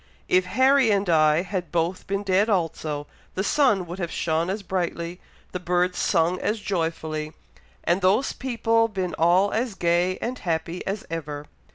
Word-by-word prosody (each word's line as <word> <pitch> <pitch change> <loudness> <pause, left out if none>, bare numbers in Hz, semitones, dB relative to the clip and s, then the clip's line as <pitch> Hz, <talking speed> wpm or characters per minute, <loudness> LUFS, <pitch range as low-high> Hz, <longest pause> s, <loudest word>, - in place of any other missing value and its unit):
"If 185 0 +3
Harry 260 +4 +4
and 200 -1 +2
I 155 0 +4
had 185 -2 -4
both 170 +2 -1
been 200 +1 -1
dead 200 +2 +2
also, 160 -6 -1 0.3
the 190 - 0
sun 210 -7 +3
would 175 +2 -7
have 170 -2 -2
shone 165 +1 -1
as 200 +2 -3
brightly, 175 -1 -3 0.3
the 180 - -4
birds 180 0 0
sung 175 0 +2
as 215 +1 -1
joyfully, 160 -5 -3 0.5
and 175 +3 +1
those 200 +9 +2
people 230 -3 +1
been 190 -5 -3
all 180 +5 +4
as 230 -1 -1
gay 175 +1 +1
and 250 +2 -4
happy 170 0 -2
as 195 +1 -3
ever! 150 -3 -5
180 Hz, 165 wpm, -24 LUFS, 170-200 Hz, 0.5 s, Harry